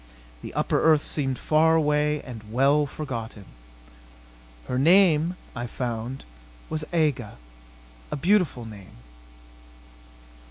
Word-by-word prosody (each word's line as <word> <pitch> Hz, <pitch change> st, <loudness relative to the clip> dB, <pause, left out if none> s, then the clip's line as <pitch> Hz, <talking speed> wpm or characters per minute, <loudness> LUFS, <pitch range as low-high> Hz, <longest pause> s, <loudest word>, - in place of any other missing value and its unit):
The -, -, -8 dB
upper -, -, +1 dB
earth 155 Hz, -2 st, +4 dB
seemed 135 Hz, -4 st, -2 dB
far 160 Hz, +1 st, +3 dB
away 150 Hz, -1 st, +1 dB
and 110 Hz, -4 st, -10 dB
well 140 Hz, +4 st, +3 dB
forgotten. 115 Hz, -8 st, -6 dB, 1.2 s
Her 125 Hz, -, -2 dB
name, 170 Hz, +1 st, +4 dB, 0.2 s
I 120 Hz, 0 st, -4 dB
found, 120 Hz, +1 st, -5 dB, 0.5 s
was 155 Hz, -1 st, -2 dB
Aga. 150 Hz, -, 0 dB, 0.7 s
A -, -, -3 dB
beautiful 170 Hz, -, +1 dB
name.... 105 Hz, -4 st, -12 dB
145 Hz, 105 wpm, -25 LUFS, 120-155 Hz, 1.2 s, earth